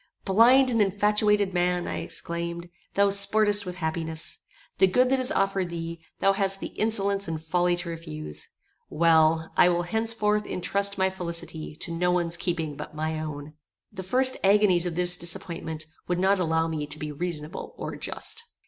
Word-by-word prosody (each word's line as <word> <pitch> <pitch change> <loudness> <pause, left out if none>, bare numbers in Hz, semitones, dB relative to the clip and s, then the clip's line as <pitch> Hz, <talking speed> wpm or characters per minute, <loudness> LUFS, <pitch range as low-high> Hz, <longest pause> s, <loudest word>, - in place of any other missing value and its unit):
Blind 245 +6 +5
and 230 -2 +2
infatuated 205 0 +2
man! 180 0 0
I - - -3
exclaimed. 170 0 -3 0.3
Thou 200 0 +3
sportest 205 0 +4
with 180 - -5
happiness. 160 -1 -3 0.4
The 190 - +6
good 250 +7 +2
that 270 - +3
is 255 +2 0
offered 195 - 0
thee, 165 -1 -6 0.2
thou 195 - +4
hast 195 -1 0
the - - -5
insolence 200 -2 -1
and 160 -1 -3
folly 175 +2 +1
to 175 0 -5
refuse. 155 - -7 0.4
Well, 160 0 +3
I 180 - +6
will 175 0 0
henceforth 210 +1 0
intrust 200 +2 +1
my 190 0 +1
felicity 170 -4 -4
to 170 - +1
no 175 +2 0
one's 175 -1 +2
keeping 165 -4 -3
but 150 +1 -9
my 155 0 -2
own. 150 -1 -6 0.4
The 195 -3 -7
first 255 +7 +3
agonies 195 -3 +4
of 170 - -4
this 180 0 +3
disappointment 165 -2 -4 0.2
would 180 - 0
not 190 +2 +2
allow 160 -2 +1
me 155 -2 -3
to 150 - -7
be 150 0 -5
reasonable 155 0 -5
or - - -5
just. 445 +1 -4
180 Hz, 170 wpm, -26 LUFS, 165-200 Hz, 0.4 s, The